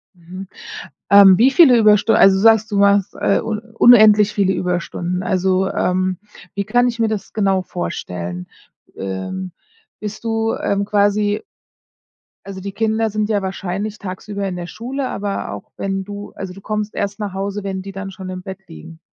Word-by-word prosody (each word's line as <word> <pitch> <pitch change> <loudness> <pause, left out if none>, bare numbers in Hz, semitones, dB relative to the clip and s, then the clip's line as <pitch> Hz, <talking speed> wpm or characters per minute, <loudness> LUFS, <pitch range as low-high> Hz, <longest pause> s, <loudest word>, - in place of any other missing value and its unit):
Mhm, 180 +2 -10 0.6
ähm, 200 -2 +8
wie 255 +6 +5
viele 270 -4 +6
Überstunden 215 0 +4
also, 195 0 +6
du - - -1
sagst, 220 0 +4
du 205 - 0
machst, 200 -1 +3
äh, - - +2
un 220 -1 -3
unendlich 215 -2 +5
viele 195 -3 +1
Überstunden. 180 0 -3
Also, 190 +1 +1
ähm, 185 0 0 0.4
wie 200 - -1
kann 245 +4 +2
ich 235 -1 -3
mir 225 - +2
das 215 -2 -4
genau 195 -3 +1
vorstellen? 90 - -5 0.5
Ähm, 95 - -5 0.5
bist 215 +1 -7
du, 225 0 -1
ähm, 200 0 -1
quasi 205 0 +1 1.0
also, 195 -1 -8
die 200 +1 -5
Kinder 220 +2 0
sind 215 0 -1
ja 205 -2 +1
wahrscheinlich 195 +2 -4
tagsüber 200 +1 -5
in 185 - -4
der 175 -1 -6
Schule, 255 +7 -5
aber 200 -1 -4
auch - - -9
wenn 195 0 -3
du 205 +1 -8
also, 190 -2 -7
du 195 - -13
kommst 215 0 -4
erst 200 +1 -3
nach 205 -3 -4
Hause, 200 +1 -4
wenn 190 -1 -4
die 195 +1 -8
dann 195 0 -7
schon 190 -1 -9
im 185 0 -6
Bett 190 +1 -8
liegen? 165 0 -12
200 Hz, 175 wpm, -19 LUFS, 185-215 Hz, 1.0 s, ähm